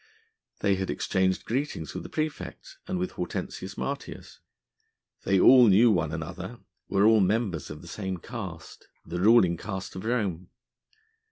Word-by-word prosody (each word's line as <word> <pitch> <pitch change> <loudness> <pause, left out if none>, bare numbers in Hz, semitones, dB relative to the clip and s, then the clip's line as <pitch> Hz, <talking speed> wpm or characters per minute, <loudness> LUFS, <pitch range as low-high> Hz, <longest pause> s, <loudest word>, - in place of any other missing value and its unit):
They 100 -2 +2
had 95 0 -3
exchanged 95 -1 0
greetings 125 - -3
with - - -5
the - - -9
praefect 155 -1 -5
and - - -2
with 90 +1 -2
Hortensius 90 - -5
Martius. - - -6 0.9
They 95 -1 +3
all 125 +4 +8
knew 110 +4 +6
one 85 -6 +1
another, 95 +7 -6 0.3
were 100 +1 +3
all 110 0 +6
members 95 - 0
of 75 +2 -9
the - - -11
same 95 +1 -4
caste, 95 -4 -8 0.2
the 90 +1 -4
ruling 95 -5 +5
caste 95 0 -6
of 95 - -6
Rome. 100 -8 -1
95 Hz, 150 wpm, -27 LUFS, 90-110 Hz, 0.9 s, all